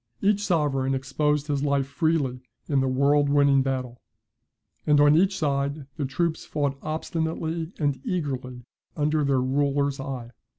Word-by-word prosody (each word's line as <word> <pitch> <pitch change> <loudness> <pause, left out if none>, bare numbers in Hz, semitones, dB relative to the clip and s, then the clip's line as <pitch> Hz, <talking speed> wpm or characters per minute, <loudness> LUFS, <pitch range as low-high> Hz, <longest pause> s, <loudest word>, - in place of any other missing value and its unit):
Each 205 0 +2
sovereign 140 -7 +1
exposed 145 +2 0
his 145 -2 -1
life 140 -1 +1
freely 140 -3 0 0.3
in 140 -2 +2
the 135 - +1
world 140 +2 +3
winning 140 -1 +4
battle; 130 -2 -3 0.9
and 150 -1 +5
on 145 +1 +6
each 190 +3 +3
side 140 -2 -1
the 145 - -2
troops 160 +5 -1
fought 140 -2 -2
obstinately 160 +1 -3
and 145 -3 -1
eagerly 135 - -3 0.3
under 150 0 +1
their 135 -2 +2
ruler's 140 +1 0
eye. 130 -4 -6
145 Hz, 140 wpm, -25 LUFS, 135-155 Hz, 0.9 s, on